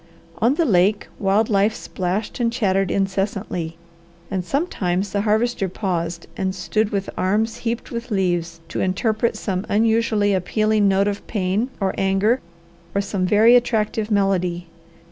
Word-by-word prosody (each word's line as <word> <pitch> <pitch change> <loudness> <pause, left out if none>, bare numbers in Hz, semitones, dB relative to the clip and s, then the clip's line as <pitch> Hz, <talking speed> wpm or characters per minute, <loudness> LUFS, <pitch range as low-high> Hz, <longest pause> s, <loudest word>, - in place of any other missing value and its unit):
On 240 +5 +3
the 335 - +2
lake 200 - +2
wild 200 +3 +2
life 205 +1 +2
splashed 185 +6 -3
and 235 -1 +1
chattered 195 -6 +1
incessantly, 195 -4 -2 0.5
and 190 -2 -1
sometimes 195 - -1
the 200 - 0
Harvester 215 -1 +1
paused 170 -3 -3
and 190 0 -2
stood 190 +4 0
with 200 -2 -2
arms 215 +4 0
heaped 235 0 -4
with 235 +1 -5
leaves, 175 -5 -1
to - - -3
interpret 215 +5 0
some 190 -2 -2
unusually 220 -1 +2
appealing 215 +3 +2
note 195 +1 +3
of 205 -1 -4
pain 205 +3 0
or 195 -2 0
anger 195 +6 +2 0.5
or 200 - +3
some 195 -2 -1
very 220 +5 +6
attractive 220 -3 +1
melody. 185 -4 +1
200 Hz, 145 wpm, -21 LUFS, 185-220 Hz, 0.5 s, very